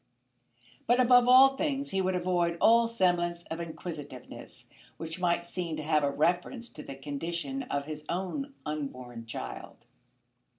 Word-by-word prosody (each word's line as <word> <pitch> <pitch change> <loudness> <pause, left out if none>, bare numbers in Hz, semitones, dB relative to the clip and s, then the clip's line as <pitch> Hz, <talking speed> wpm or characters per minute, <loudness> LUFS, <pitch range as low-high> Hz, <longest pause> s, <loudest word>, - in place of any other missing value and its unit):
But 240 +1 +4
above 245 -1 +6
all 260 +2 +9
things 280 -1 -2
he 195 0 +1
would 185 0 0
avoid 175 -1 0
all 230 0 +5
semblance 175 -6 +1
of 165 - -3
inquisitiveness 160 -5 -8 0.3
which 165 +2 -6
might 170 -1 +1
seem 175 -2 -4
to 155 - -5
have 155 -1 +2
a 140 - +2
reference 180 - 0
to 150 - -8
the 140 - -8
condition 170 - -4
of 140 0 -1
his 150 0 -6
own 190 +11 -3
unborn 130 -6 -5
child. 115 - -7
175 Hz, 145 wpm, -29 LUFS, 150-230 Hz, 0.3 s, all